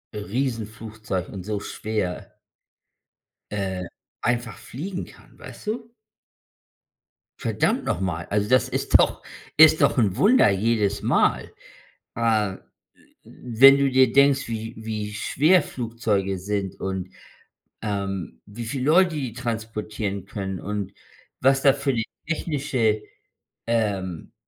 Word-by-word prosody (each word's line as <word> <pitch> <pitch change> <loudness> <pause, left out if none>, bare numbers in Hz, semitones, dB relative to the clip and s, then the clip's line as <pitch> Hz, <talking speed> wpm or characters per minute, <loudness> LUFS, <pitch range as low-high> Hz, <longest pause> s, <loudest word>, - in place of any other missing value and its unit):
Riesenflugzeug 110 -3 -4
und 95 -3 -7
so 105 -1 -2
schwer 105 -4 -4 1.1
äh, 95 -3 -2 0.4
einfach 120 -5 -1
fliegen 180 +8 -6
kann, - - -18
weißt - - -11
du? 230 +2 -3 1.5
Verdammt - - 0
noch 90 - -1
mal. 85 -3 -2
Also, 105 +1 0
das 130 0 +4
ist - - +3
doch - - +1 0.3
ist 155 0 +8
doch - - +3
'n 100 -6 +2
Wunder 220 - +5
jedes 105 0 +1
Mal. - - +1 0.6
Äh, 110 -4 +1 0.7
wenn 135 +3 +5
du 140 -1 +2
dir 130 -2 +5
denkst, 140 0 +4
wie 115 +1 -5
wie 110 -2 -5
schwer 155 - +3
Flugzeuge 110 -5 -2
sind 100 -1 -3
und, 95 -1 -3 0.7
ähm, 95 - -4
wie 115 +3 -8
viel 130 +2 -3
Leute 170 +2 +4
die 130 -6 -3
transportieren 110 -4 -4
können 95 -2 -5
und 100 -1 -4 0.5
was 135 +1 +4
da 140 - +6
für 140 -1 -1
'ne 115 - 0 0.2
technische, 135 -9 0 0.6
ähm, 100 -7 -1
110 Hz, 120 wpm, -24 LUFS, 100-130 Hz, 1.5 s, ist